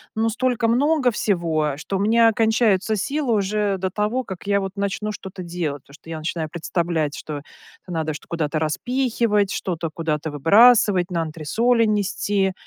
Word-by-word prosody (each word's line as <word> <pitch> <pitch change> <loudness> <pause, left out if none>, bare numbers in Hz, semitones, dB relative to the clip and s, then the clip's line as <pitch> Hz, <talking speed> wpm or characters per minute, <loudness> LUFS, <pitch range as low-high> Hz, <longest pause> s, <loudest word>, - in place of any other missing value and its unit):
ну, 225 +1 +1
столько 245 0 0
много 265 +2 +2
всего, 165 -8 0
что 190 +6 -3
у - - -4
меня 225 +3 +4
кончаются 220 -2 +2
силы 270 +3 -1
уже 205 0 0
до 190 0 -2
того, 215 +6 -1
как 190 -3 -9
я, 200 0 +3
вот, 195 -1 -4
начну 200 +1 -2
что-то 190 -3 -8
делать, 165 -5 -4
потому 140 - -19
что 160 - -15
я 165 - -4
начинаю 155 0 -3
представлять, 165 -2 -2
что 150 -2 -6 0.5
надо 160 -3 -2
чт - - -10
куда-то 160 -2 -2
распихивать, 220 - 0
что-то 170 -3 -3
куда-то 155 -2 -2
выбрасывать, 200 - +5
на 170 -2 0
антресоли 220 +10 +1
нести. 205 -2 0
195 Hz, 160 wpm, -22 LUFS, 165-225 Hz, 0.5 s, выбрасывать